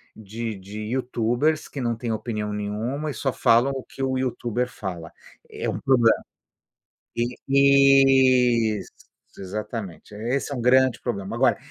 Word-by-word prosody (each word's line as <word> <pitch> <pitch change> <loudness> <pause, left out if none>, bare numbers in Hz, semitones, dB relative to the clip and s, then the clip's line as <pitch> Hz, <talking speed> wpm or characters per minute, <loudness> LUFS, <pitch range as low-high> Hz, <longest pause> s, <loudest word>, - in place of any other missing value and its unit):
de 110 +1 -6
de 100 +2 -9
youtubers, 130 +4 0
que 140 - -6
não 120 -1 0
têm 115 0 -4
opinião 105 -2 -4
nenhuma 115 +9 -3
e - - -6
só 135 -1 -2
falam 120 +4 +3
o 130 - -5
que - - -11
o 130 -1 0
youtuber 125 -1 -2
fala. 90 -8 -7 0.4
É - - -4
um - - -3
problema. 120 -4 +3 0.9
E, 130 -3 +4
isso, - - -11 0.5
exatamente, 100 0 -6
esse 125 +6 -2
é - - -4
um 125 - -4
grande 130 0 +3
problema. 100 -6 -4
Agora, - - +3
120 Hz, 145 wpm, -24 LUFS, 110-130 Hz, 0.9 s, E